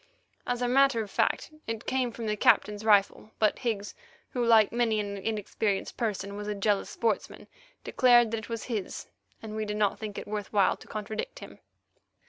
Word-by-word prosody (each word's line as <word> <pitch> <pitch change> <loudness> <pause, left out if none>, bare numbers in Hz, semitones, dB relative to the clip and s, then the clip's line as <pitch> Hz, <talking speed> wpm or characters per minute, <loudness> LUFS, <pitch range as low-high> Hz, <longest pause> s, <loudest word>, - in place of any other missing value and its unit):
As 245 0 -1
a - - +1
matter 265 -2 +4
of 205 - -11
fact, - - 0 0.2
it 225 0 -4
came 255 -2 0
from 230 0 -6
the 210 -1 0
Captain's 210 0 +3
rifle, 210 0 +3
but 215 -1 +2
Higgs, 215 -5 -2 0.4
who, 245 - -1
like 225 -3 +5
many 230 -2 +1
an 200 -1 -3
inexperienced 205 0 -2
person 200 -3 -3
was 205 0 -6
a 210 - -2
jealous 200 0 0
sportsman, 230 -2 -2 0.4
declared 240 -3 +4
that 230 - -1
it 220 - -11
was 230 -2 -4
his 215 -6 -4 0.4
and 215 -1 -6
we 220 - -2
did 210 0 -3
not 205 -2 +1
think 215 -2 -6
it - - -6
worth 210 -1 -4
while 200 -3 +3
to - - -16
contradict 215 - -5
him. - - -11
215 Hz, 190 wpm, -28 LUFS, 205-230 Hz, 0.4 s, like